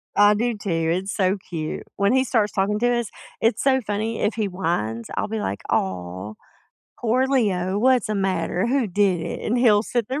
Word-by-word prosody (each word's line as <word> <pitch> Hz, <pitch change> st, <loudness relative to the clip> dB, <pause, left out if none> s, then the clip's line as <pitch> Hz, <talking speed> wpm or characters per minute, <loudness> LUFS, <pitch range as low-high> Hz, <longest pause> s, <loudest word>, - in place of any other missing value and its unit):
I 205 Hz, 0 st, +6 dB
do 235 Hz, +2 st, 0 dB
too, 200 Hz, -, -6 dB
it's 170 Hz, +4 st, 0 dB
so 190 Hz, 0 st, +2 dB
cute. 155 Hz, -3 st, -4 dB
When 200 Hz, +3 st, +2 dB
he 260 Hz, 0 st, +4 dB
starts 220 Hz, -5 st, +1 dB
talking 205 Hz, +2 st, 0 dB
to 245 Hz, +1 st, +2 dB
us, 230 Hz, -, -4 dB, 0.3 s
it's 225 Hz, +2 st, +2 dB
so 265 Hz, -1 st, +4 dB
funny, 215 Hz, +2 st, -2 dB
if 210 Hz, -, +1 dB
he 215 Hz, -3 st, 0 dB
whines, 115 Hz, -, -2 dB
I'll -, -, -1 dB
be 220 Hz, +1 st, -3 dB
like, 100 Hz, -, -3 dB
"Aw, 95 Hz, +2 st, -2 dB, 0.7 s
poor 245 Hz, +3 st, +2 dB
Leo, 200 Hz, -8 st, +1 dB
what's 250 Hz, -1 st, +3 dB
a 215 Hz, -, -1 dB
matter? 190 Hz, 0 st, 0 dB
Who 255 Hz, -1 st, +1 dB
did 190 Hz, -2 st, +1 dB
it?" 165 Hz, -, -5 dB
and 240 Hz, +3 st, +1 dB
he'll 215 Hz, -4 st, +5 dB
sit 235 Hz, -2 st, -1 dB
there, 270 Hz, +3 st, -2 dB
205 Hz, 200 wpm, -23 LUFS, 180-235 Hz, 0.7 s, I